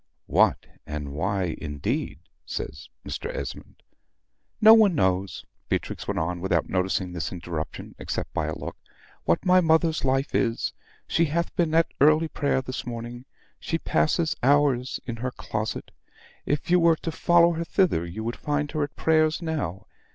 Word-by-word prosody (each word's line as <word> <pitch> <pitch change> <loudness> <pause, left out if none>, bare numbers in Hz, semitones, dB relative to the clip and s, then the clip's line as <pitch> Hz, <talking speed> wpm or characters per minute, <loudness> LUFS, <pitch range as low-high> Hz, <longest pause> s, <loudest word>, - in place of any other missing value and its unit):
"What, - - +3 0.2
and 75 -2 -5
why, 90 +2 -1
indeed," 75 -3 -3 0.3
says 75 +4 -6 0.2
Mr. - - -4
Esmond. - - -7 0.8
"No 220 +1 +9
one 215 -5 +6
knows," 95 - 0 0.2
Beatrix - - -2
went - - -2
on, 85 +2 -2
without 90 -3 +1
noticing 90 0 -1
this 85 - -3
interruption 85 -3 -6
except - - -4
by 75 - -1
a 80 - -3
look, - - -6 0.5
"what 85 - +1
my 185 0 +6
mother's 160 -1 +2
life 135 +1 +1
is. 115 -1 0 0.3
She 165 - +2
hath 170 +3 -2
been 160 -2 +1
at 165 0 +3
early 155 +2 +5
prayer 140 -3 0
this 130 0 -5
morning; 120 +1 -6 0.3
she 165 - -2
passes 160 0 +1
hours 135 -2 +2
in 120 -2 -5
her 125 +3 -2
closet; 110 -3 -4 0.6
if 145 +3 -1
you 180 - +6
were 165 -1 +5
to 165 - -5
follow 170 +1 +4
her 165 0 -2
thither, 170 - +2
you 85 +6 -6
would 115 +2 -3
find 145 0 -1
her 155 - -2
at 145 -3 -3
prayers 155 0 +2
now. 145 - -3
130 Hz, 160 wpm, -26 LUFS, -, 0.8 s, No